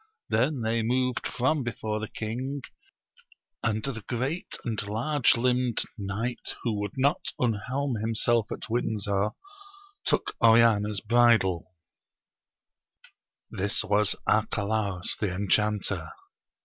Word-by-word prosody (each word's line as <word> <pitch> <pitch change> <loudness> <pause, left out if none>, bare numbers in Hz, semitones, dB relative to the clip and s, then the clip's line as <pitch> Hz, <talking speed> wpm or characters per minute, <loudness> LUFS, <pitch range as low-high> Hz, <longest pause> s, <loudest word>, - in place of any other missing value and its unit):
Then 125 +4 +1
they 115 +1 +1
moved 125 +2 0
from 140 +5 +1
before 110 -3 -3
the 110 - -4
king, 130 +7 -4 1.0
and 110 -1 0
the 120 -6 -4
great 130 +8 -3
and 110 -4 0
large 120 +6 +2
limbed 125 -1 +1
knight 110 +3 -3
who 115 - 0
would 105 +4 -4
not 140 +2 +1
unhelm 125 +3 -1
himself 115 0 +1
at - - -5
Windsor, 105 -3 0 0.7
took - - 0
Oriana's 110 -3 +5
bridle: 110 -6 +3 1.8
this 100 +3 0
was 105 0 +3
Arcalaus 105 -3 +1
the 105 -4 0
enchanter. 100 -3 0
110 Hz, 105 wpm, -27 LUFS, 105-125 Hz, 1.8 s, Oriana's